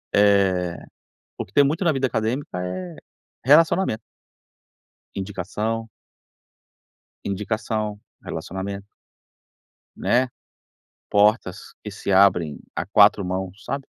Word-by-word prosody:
Eh, 95 -4 +3 0.6
o - - -4
que - - -23
tem 145 - +5
muito 155 +7 0
na 170 - +4
vida 135 -2 0
acadêmica 115 -2 -2
é 90 -2 -5 0.5
relacionamento. 155 -2 +4 1.1
Indicação. 105 +4 -3 1.3
Indicação, 105 +1 -2 0.2
relacionamento. 100 +1 -5 1.1
Né, 125 +2 +2 0.8
portas 105 -2 +2
que 105 - -6
se 100 0 -3
abrem 90 -5 +4
a - - -2
4 100 +1 +5
mãos, 95 +2 -4
sabe. 140 0 -4
105 Hz, 95 wpm, -23 LUFS, 95-115 Hz, 1.3 s, tem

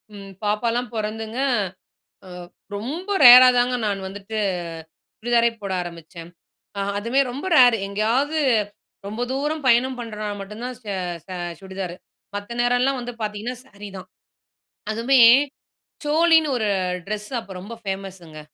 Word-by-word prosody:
ம், 195 -1 -10
பாப்பாலாம் 235 +4 -1
பொறந்துங்க, 220 +2 -4 1.4
ரொம்ப 295 - -5 0.2
ரேரா 250 +1 +11
தாங்க, 245 +1 +2
நான் 195 -1 -2
வந்துட்டு 200 +3 -7 0.8
சுடிதாரே 235 0 +3
போட 195 - -3
ஆரம்பிச்சேன். 170 0 -10 0.5
அ - - -1 0.2
அதுவுமே 235 +6 +1
ரொம்ப 275 +8 -6
ரேரு. 245 -3 +7
எங்கேயாவது 240 +10 0 0.7
ரொம்ப 215 +4 -4
தூரம் 295 +2 -2
பயணம் 250 +1 +3
பண்றனா 215 -2 -5
மட்டுந்தான், 225 +6 -7
சே 210 -2 -5 0.3
சே 185 - -7 0.3
சுடிதாரு. 190 -2 -6 0.4
மத்த 205 +3 -6
நேரல்லாம் 245 +2 +2
வந்து 245 0 -6
பாத்தீங்கன்னா, 215 +4 -4
சாரி 205 -3 -11
தான். 185 - -9 0.8
அதுவுமே, 235 +5 +2 0.9
சோலின்னு 320 0 +4
ஒரு 220 -3 0 0.4
ட்ரெஸ், 210 +1 -4
அப்ப 200 -4 -11
ரொம்ப 210 +5 -8
ஃபேமஸ்ஸுங்க. 190 -5 -6
225 Hz, 120 wpm, -22 LUFS, 200-250 Hz, 1.4 s, ரேரா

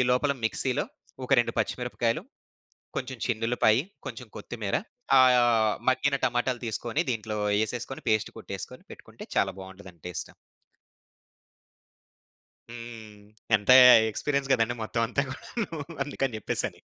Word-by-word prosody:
లోపల 140 +3 +2
మిక్సీలో 125 +2 0 0.4
ఒక 140 - -1
2 120 - -2
పచ్చిమిరపకాయలు, 120 +4 -1 0.8
కొంచెం 130 -1 -4
చిన్నుల్లిపాయి, 115 0 +2 0.3
కొంచెం 120 0 -8
కొత్తిమీర, 105 -5 -4 0.5
ఆయ 130 -1 +6 0.5
మగ్గిన 140 +2 +1
టమాటాలు 125 0 0
తీసుకొని 120 +8 -1
దీంట్లో 110 -2 -4 0.2
యేసేసుకొని 120 +4 -3
పేస్టు 110 -1 0
కొట్టేసుకొని - - -7
పెట్టుకుంటే - - -12
చాలా - - +2
బావుంటదండి 95 -3 -12
టేస్ట్. 90 - -5 2.4
హ్మ్. 115 -3 -10 0.3
ఎంత 105 +4 -1 0.4
ఎక్స్‌పీరియన్స్ 140 +3 -2
గదండీ! 120 -1 +2
మొత్తం 115 +1 -2
అంతా 140 +4 0
గూడాను 180 - -5 0.3
అందుకని 135 -4 -2
జెప్పేసని. - - -2
120 Hz, 105 wpm, -27 LUFS, 110-130 Hz, 2.4 s, ఆయ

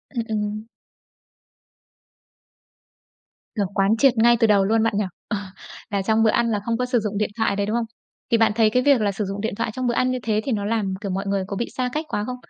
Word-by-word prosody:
Ừm, 235 - 0
ừm. 215 0 -3 2.9
Kiểu, 205 -3 0
quán 200 +3 +2
triệt 270 0 +5
ngay 235 +1 +5
từ 225 - +4
đầu 200 -2 +4
luôn 220 +2 +2
bạn 225 - +1
nhỉ? 210 - +1 0.2
Ờ. 210 - -1 0.5
Là 200 -1 -1
trong 220 +3 +2
bữa 220 - +4
ăn 235 +1 +1
là 210 - 0
không 230 -1 0
có 250 - 0
sử 250 -1 +1
dụng 210 -2 -3
điện 210 - 0
thoại 220 -3 +1
đấy, 200 0 0
đúng 215 +2 -2
không? 235 - -1 0.5
Thì 230 - +5
bạn 225 -1 +4
thấy 220 -1 +4
cái 250 +3 +1
việc 280 -4 +4
là 205 -1 +1
sử 200 +2 -3
dụng 195 +1 -4
điện 220 -2 -2
thoại 230 +1 -2
trong 255 +1 -2
bữa 240 - +1
ăn 255 +1 +1
như 255 - -2
thế 215 -1 0
thì 270 - -1
nó 205 -3 -1
làm, 210 -3 -1
kiểu, 200 -3 -3
mọi 195 +2 -3
người 195 -1 0
có 200 - -4
bị 235 - -2
xa 250 -1 0
cách 305 +1 -2
quá 205 -9 -2
không? 250 - -4
220 Hz, 255 wpm, -23 LUFS, 205-235 Hz, 2.9 s, triệt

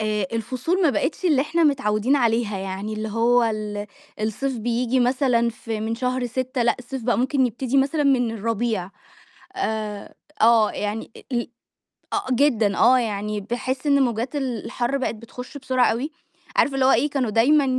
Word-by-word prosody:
آآ 210 -2 0
الفصول 255 - -1
ما 315 - +5
بقتش 325 +7 -2
اللي 300 -7 +4
إحنا 330 +3 +1
متعوّدين 265 -3 +2
عليها، 230 -5 +1
يعني 195 +2 -4
اللي 215 0 -3
هو 235 +3 +3
ال 210 -2 -3 0.3
الصيف 235 +4 -2
بييجي 240 +3 0
مثلًا 245 -2 +2
في 225 -1 -5
من 225 +1 -2
شهر 250 +1 -1
6 255 +1 -2
لأ، 235 - +2
الصيف 255 +1 -6
بقى 240 +1 +1
ممكن 260 +1 +2
يبتدي 245 +3 -2
مثلًا 275 +3 +2
من 255 -4 +3
الربيع، 225 -3 -2 0.7
آآ 215 - -3 0.3
آه، 225 -1 +5
يعني 210 +2 -4
أ - - -10
ال 240 -1 -1 0.6
آه 405 - -1
جدًا، 235 -6 +2
آه، 255 - +6
يعني 210 -2 -2
باحس 255 +6 -3
إن 280 -1 +4
موجات 240 +3 -2
ال 255 -6 -3
الحر 245 +2 -1
بقت 260 -4 -2
بتخش 250 +5 -9
بسرعة 260 -2 +1
أوي، 265 +7 -3 0.4
عارف 280 - +3
اللي 270 -1 +2
هو 265 - +6
إيه، 270 +5 +3
كانوا 270 -5 -1
دايمًا 275 +7 +4
240 Hz, 170 wpm, -23 LUFS, 220-265 Hz, 0.7 s, آه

